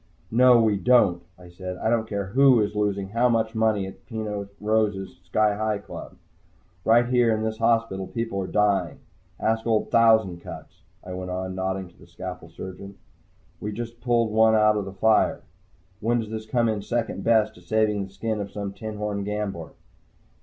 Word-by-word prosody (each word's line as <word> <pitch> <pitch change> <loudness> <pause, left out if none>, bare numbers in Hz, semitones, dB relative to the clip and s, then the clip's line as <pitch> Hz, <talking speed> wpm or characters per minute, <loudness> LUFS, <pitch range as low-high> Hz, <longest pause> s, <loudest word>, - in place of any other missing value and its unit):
"No, 125 +1 +6
we 110 -3 +3
don't," 100 -6 +4 0.2
I 90 -1 -14
said. 90 +1 -7
"I 110 - 0
don't 115 -1 0
care 100 -1 -2
who 130 +4 +5
is 105 -1 0
losing 100 -2 -1
how 120 +4 +2
much 110 -1 +1
money 110 -3 +1
at 95 - -11
Peno 105 -3 -4
Rose's 105 -4 -1
Sky 105 +3 +2
Hi 110 0 -1
Club. 100 - -10 0.7
Right 120 +4 +5
here 120 -1 +3
in 110 - -3
this 110 0 -3
hospital 115 -4 +1
people 115 -4 -3
are 95 - -4
dying. 100 -5 +1 0.4
Ask 110 +1 0
old 110 -2 +1
Thousand 110 -6 +4
Cuts," - - -11 0.2
I 90 - -7
went 90 0 -5
on, 95 +1 -3
nodding 95 0 -3
to 85 - -25
the 85 - -16
scalpel 90 0 -8
surgeon. 95 +3 -9 0.6
"We 105 - -4
just 120 +1 -7
pulled 120 -3 +1
one 110 0 +5
out 105 0 +4
of 105 -2 -2
the 95 - -6
fire. 110 +3 +2 0.6
When 120 +3 +1
does 110 -1 -5
this 110 0 -5
come 120 0 +1
in 110 -2 -1
second 115 -3 -2
best 110 -2 +3
to 90 - -17
saving 105 +2 +1
the 95 - -9
skin 105 +2 -3
of 100 - -5
some 100 -1 -5
tinhorn 105 0 -4
gambler?" 105 -4 -4
105 Hz, 185 wpm, -25 LUFS, 95-110 Hz, 0.7 s, No